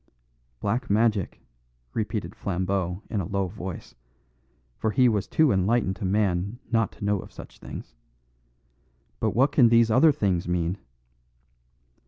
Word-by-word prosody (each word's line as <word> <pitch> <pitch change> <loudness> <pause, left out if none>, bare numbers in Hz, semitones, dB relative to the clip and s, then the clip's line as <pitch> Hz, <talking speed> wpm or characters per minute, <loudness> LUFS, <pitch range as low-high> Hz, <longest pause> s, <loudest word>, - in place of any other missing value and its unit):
"Black 110 - -2
magic," 105 -2 +1 0.5
repeated 105 -4 -3
Flambeau 95 0 -2
in 105 -4 -2
a 85 - -5
low 100 0 -1
voice, 95 -1 -7 0.9
for 110 - 0
he 125 +4 +4
was 105 -4 0
too 155 -4 +3
enlightened 95 +1 +1
a - - -1
man 100 +1 0
not 115 -2 +2
to - - -7
know 100 -1 +1
of - - -10
such - - -12
things; - - -9 1.3
"but - - 0
what 135 +4 +4
can 125 -5 +5
these 115 -1 +4
other 145 +7 +6
things 95 - 0
mean?" 90 +2 -1
100 Hz, 140 wpm, -26 LUFS, 95-115 Hz, 1.3 s, other